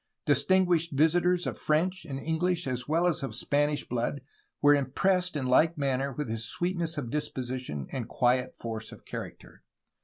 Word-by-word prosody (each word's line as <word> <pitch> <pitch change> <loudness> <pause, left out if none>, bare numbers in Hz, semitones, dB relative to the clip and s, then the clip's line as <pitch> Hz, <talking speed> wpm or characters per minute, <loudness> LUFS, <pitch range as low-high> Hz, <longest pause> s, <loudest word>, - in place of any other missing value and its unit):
Distinguished 165 +3 +3
visitors 175 +3 +3
of - - -4
French 175 +4 0
and 135 -4 -5
English 165 +3 0
as 125 -2 -3
well 165 +4 +2
as 175 -4 +1
of 135 - -4
Spanish 145 0 0
blood 125 +4 -2 0.4
were 145 0 +6
impressed 180 +6 +1
in 140 -3 -1
like 155 +6 +4
manner 135 -1 0
with 150 +2 -4
his 110 0 -1
sweetness 175 -3 -1
of 120 -5 -4
disposi 130 -4 -3
tion 75 - -5
and 125 -4 -4
quiet 125 -1 +1
force 110 -1 -5
of - - -13
character. - - -8
145 Hz, 165 wpm, -29 LUFS, 130-170 Hz, 0.4 s, were